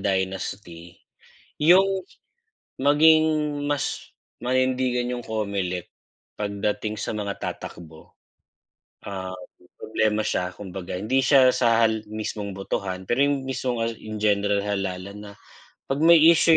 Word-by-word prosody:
dynasty, 95 -2 -3 0.7
yung 180 +5 +7 0.9
maging 155 +3 +5 0.4
mas 145 -1 -3 0.2
manindigan 125 0 0
yung 120 -1 -5
Comelec 100 -5 -3 0.5
pagdating 105 +1 -2
sa - - -3
mga 100 -1 -3
tatakbo. 80 -2 -8 0.9
Um, 95 -2 -6 0.5
problema 110 -1 0
siya 90 -3 -1
kumbaga 95 -2 -8
hindi 110 +9 0
siya 135 -3 +6
sa 115 -2 +3
hal 110 -1 +1
mismong 105 -1 -5
botohan 95 -1 -4
pero 135 +4 +3
yung 140 -2 -1
mismong 125 -2 -2
hal 115 0 0
in 110 -1 -7
general 100 -1 +2
halalan 100 -1 -4
na 100 - -10 0.5
'pag 135 +1 -2
may 170 +1 +7
issue 165 0 +6
105 Hz, 115 wpm, -24 LUFS, 100-130 Hz, 0.9 s, yung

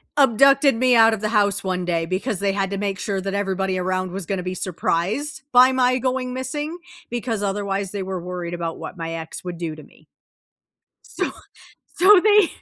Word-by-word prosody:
abducted 275 0 +5
me 250 +1 +3
out 225 -1 +6
of 210 - -10
the 215 - -1
house 205 -3 +1
one 185 -1 -2
day 170 -2 0
because 190 +6 -2
they 200 -1 0
had 195 -1 -1
to 200 - -3
make 195 -1 -2
sure 195 0 -2
that 195 +1 -4
everybody 190 -1 -1
around 185 0 -2
was 190 0 -5
gonna 190 -2 -2
be 185 0 -3
surprised 195 - -2
by 255 +1 +7
my 255 -1 +2
going 255 0 -2
missing 295 +5 -4 0.3
because 235 -2 -3
otherwise 200 -1 -2
they 200 -2 -4
were 185 -1 -4
worried 175 -1 -5
about 170 -1 -4
what - - -8
my 165 -1 -4
ex 160 -1 -7
would 180 -1 -6
do 165 -2 -4
to 155 - -11
me. - - -22 1.1
So, - - -1 0.7
so 380 +2 +7
they, 420 -4 +5
200 Hz, 195 wpm, -22 LUFS, 185-255 Hz, 1.1 s, by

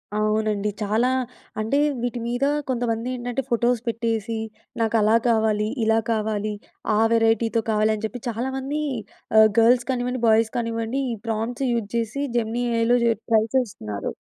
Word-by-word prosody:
అవునండి. 215 -1 +1
చాలా 220 +5 +2 0.5
అంటే, 220 +6 0 0.2
వీటి 245 0 -2
మీద 245 +3 -1 0.3
కొంతమంది 240 -1 -1
ఏంటంటే, 245 +1 -3
ఫోటోస్ 240 0 +2
పెట్టేసి, 230 -1 -1 0.4
నాకు 225 0 +1
అలా 215 +2 +4
కావాలి, 220 -2 +2 0.2
ఇలా 225 0 +3
కావాలి, 215 -1 -1 0.4
ఆ - - +3
వెరైటీతో 225 0 +2
కావాలి, 215 0 +2
అని 210 - -8
చెప్పి 245 +1 -9
చాలామంది 265 +5 -3 0.6
ఆహ్, 220 0 +7
గర్ల్స్ 240 +1 +5
కానివ్వండి, 250 -1 -2
బాయ్స్ 220 0 +4
కానివ్వండి, 230 +2 -2
ఈ - - -2
ప్రాంప్ట్స్ 230 +4 -2
యూజ్ 225 -4 -2
చేసి, 235 +5 -1
జెమినీ 235 +1 -1
ఏఐలో 230 +2 +3
చె 235 - +4 0.2
ట్రై 220 -1 +5
చేస్తున్నారు. 110 - -3
230 Hz, 145 wpm, -23 LUFS, 220-245 Hz, 0.6 s, ఆహ్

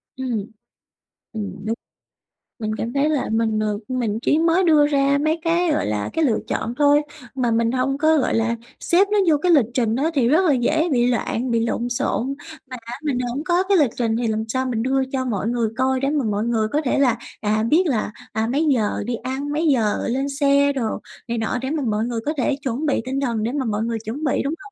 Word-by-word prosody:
Ừm. 245 -6 -3 0.9
Ừm, 205 -2 -6
đúng. 225 +1 -1 0.8
Mình 215 -1 -2
cảm 230 +2 -3
thấy 285 +2 +2
là 300 -4 0
mình, 220 -1 +1
ờ, 210 -1 -1
mình 235 -4 -1
chỉ 300 - +2
mới 335 +3 +3
đưa 305 -4 +5
ra 280 -1 +2
mấy 310 +2 +1
cái, 340 0 +2
gọi - - 0
là, 105 -1 -2
cái 325 - +1
lựa 235 -5 +2
chọn 230 - -2
thôi, 290 0 +5 0.3
mà 250 -3 0
mình 230 0 +2
hông 260 +2 0
có, 315 +2 +3
gọi 270 - +1
là, 230 +1 +1 0.2
xếp 375 +4 +3
nó 420 - +3
vô 305 - +4
cái 355 +5 +1
lịch 285 -8 +5
trình 230 -4 +1
đó, 285 +6 +1
thì 265 -6 +2
rất 320 +9 +4
là 310 - +4
dễ 310 +7 +1
bị 245 -2 +3
loạn, 245 0 -1
bị 230 - +2
lộn 235 +1 -2
xộn. 245 +2 -1 0.4
Mà 255 - -6
á 235 - -6
mình 280 -5 0
hổng 250 +3 -3
có 350 +1 +2
cái 390 0 +3
lịch 290 -6 +4
trình 230 -2 0
thì 235 -1 -1
làm 220 0 -1
sao 260 +3 -1
mình 235 -3 -1
đưa 265 +1 +1
cho 260 -1 -1
mọi 215 -4 -2
người 235 -1 0
coi, 260 0 +1
để 275 +1 0
mà 290 -3 0
mọi 210 -1 0
người 225 -2 +1
có 290 +7 0
thể 275 -3 0
là, 250 -4 +3 0.2
à, 215 0 +1
biết 320 +10 +3
là, 230 -7 -1 0.2
à, 220 +1 0
mấy 295 +5 +1
giờ 215 -5 0
đi 240 - -2
ăn, 265 +5 -4
mấy 315 +3 0
giờ 230 -8 +1
lên 270 +3 -1
xe 280 0 +3
đồ 245 -5 -1 0.4
này 235 0 -2
nọ, 225 +2 -1
để 265 - -3
mà 310 -2 -1
mọi 215 0 0
người 235 -1 -2
có 300 - 0
thể 270 +1 +1
chuẩn 265 +2 -2
bị 285 - +1
tinh 265 +1 -2
thần, 235 -5 -1
để 230 - -1
mà 275 -1 -2
mọi 215 -1 -1
người 230 0 -2
chuẩn 245 +8 -5
bị, 285 - +1
đúng 280 +3 -1
hông? 410 - -13
255 Hz, 245 wpm, -22 LUFS, 230-290 Hz, 0.9 s, đưa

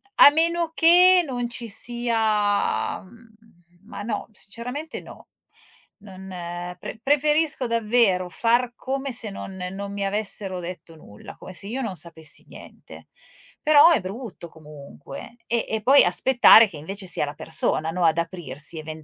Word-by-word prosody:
a - - +9
meno 335 +1 0
che 360 +2 +6
non 245 -4 -3
ci 240 -1 -6
sia 220 -2 0
mhmm, 225 +2 -19 0.5
ma 215 - -9
no, 215 -2 -4
sinceramente 245 +9 -7
no. - - -14 0.7
Non 190 -2 -12 0.5
pre - - -8
preferisco 295 +1 +2
davvero 220 -5 +1
far 240 +5 +1
come 270 +1 -4
se 230 -2 -1
non 195 -1 -8 0.2
non 200 +1 -6
mi 200 -1 -3
avessero 195 -2 -3
detto 175 -1 -9
nulla, 105 -9 -13
come 185 - -11
se 180 - -3
io 250 +5 -4
non 215 -7 -4
sapessi 160 -2 -4
niente; - - -14 0.6
però 305 +1 +7
è 315 - +3
brutto 195 -1 -8
comunque, 150 - -12
e 235 0 -1
e 220 0 -3
poi 270 +6 +6
aspettare 230 +4 +6
che 155 - -10
invece 190 +6 -8
sia 170 - +1
la 145 - -7
persona, 160 +1 -2
no 180 0 -1
ad 160 0 +3
aprirsi 165 -3 -4
even 155 0 -9
215 Hz, 150 wpm, -23 LUFS, 180-250 Hz, 0.7 s, a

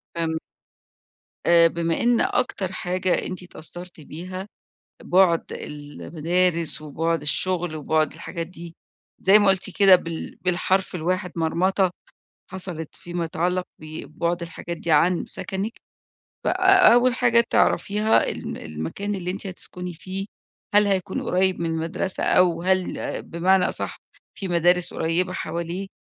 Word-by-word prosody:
فهمت. 160 -1 -1 1.1
آآ 170 -1 +7
بما 165 0 -1
إن 240 0 +3
أكتر 200 -7 0
حاجة 185 0 -1
أنتِ 185 0 -5
اتأثَّرتِ 175 0 -9
بيها 185 +6 -7 0.6
بُعد 180 -2 +3
المدارس 160 +3 -1
وبُعد 165 +3 -1
الشغل 175 +2 0
وبُعد 155 0 0
الحاجات 165 -1 -6
دي 170 -1 -11 0.4
زي 195 +3 +6
ما 205 -1 +3
قلتِ 190 0 +2
كده 195 -2 +8
بال 165 -2 -6
بالحرف 185 +1 0
الواحد، 180 +2 -2
مرمطة 180 +3 +1 0.6
حصَلِت 180 -4 -5
فيما 175 0 -4
يتعلّق 180 +3 -1 0.2
ببُعد 160 +2 -4
الحاجات 170 0 -6
دي 170 - -4
عن 170 +4 +3
سكَنِك، 195 +3 -2 0.7
ف - - -5
أ 370 -1 +6
أول 245 +1 +4
حاجة 235 -2 +3
تعرفيها 210 +2 +2
ال - - -6
المكان 80 - -4
اللي 180 -2 -3
أنتِ 195 +1 -4
هتسكِني 180 -1 -6
فيه، 190 +4 -6 0.5
هل 205 0 +6
هيكون 190 -1 -1
قريّب 185 0 +1
من 170 - -1
المدرسة 165 +3 -2
أو 175 -2 +3
هل 185 0 -1
بمعنى 180 +2 +2
أصَح - - -3 0.3
فيه 195 - -5
مدارس 175 0 +2
قريّبة 170 +3 0
حواليه، 170 +2 -4
180 Hz, 130 wpm, -23 LUFS, 165-190 Hz, 1.1 s, كده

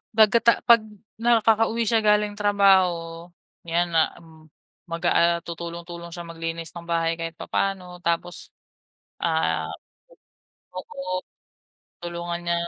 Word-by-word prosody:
'Baga 220 +1 +6
ta 235 - +9
'pag 235 -1 +7 0.4
nakakauwi 225 -1 +3
siya 225 +1 +3
galing 210 0 +3
trabaho, 200 -3 +4 0.7
'yan 170 +1 +2
na 165 - +5 0.2
m - - -17 0.6
mag, 170 0 -4
ah, - - +3 0.2
ah, - - -12
tutulong-tulong 170 0 -7
siya 175 -1 -7
maglinis 165 0 -5
ng 170 -1 -9
bahay 165 0 +1
kahit 165 0 -5
papaano, 195 -2 -1 0.2
tapos, 170 +1 -1 0.9
ah 160 - 0 1.1
oo. 185 0 -5 0.8
Tulungan 170 0 -4
niya 170 0 +1
175 Hz, 120 wpm, -24 LUFS, 170-205 Hz, 1.1 s, ta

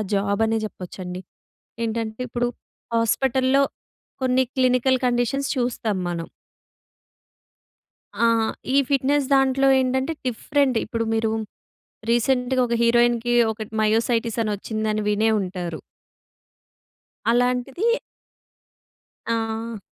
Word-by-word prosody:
Job 200 +2 +1
అనే 225 0 +1
చెప్పొచ్చండి. 180 -2 -8 0.6
ఏంటంటే 225 0 -3
ఇప్పుడు 240 +1 -1 0.5
హాస్పిటల్‍లో 260 +4 +2 0.6
కొన్ని 260 0 +3
క్లినికల్ 255 0 +3
కండిషన్స్ 245 +3 0
చూస్తాం 235 -5 -1
మనం. 170 -1 -3 2.0
ఆహ్, 230 -1 +3 0.3
ఈ - - +5
ఫిట్‌నెస్ 275 0 +2
దాంట్లో 270 0 +3
ఏంటంటే, 260 +4 0
డిఫరెంట్. 260 +2 +1
ఇప్పుడు 230 -1 -2
మీరూ 225 0 +1 0.8
రీసెంట్‌గా 250 +2 +2
ఒక 235 - -1
హీరోయిన్‌కి 240 0 +3 0.2
ఒకటి 220 0 -8
మయోసైటిసని 225 0 +1
ఒచ్చిందని 215 +1 -2
వినే 215 +2 +2
ఉంటారు. 180 -4 -4 1.5
అలాంటిది 250 - +1 1.5
ఆహ్ 225 0 -4
235 Hz, 85 wpm, -23 LUFS, 220-255 Hz, 2.0 s, ఈ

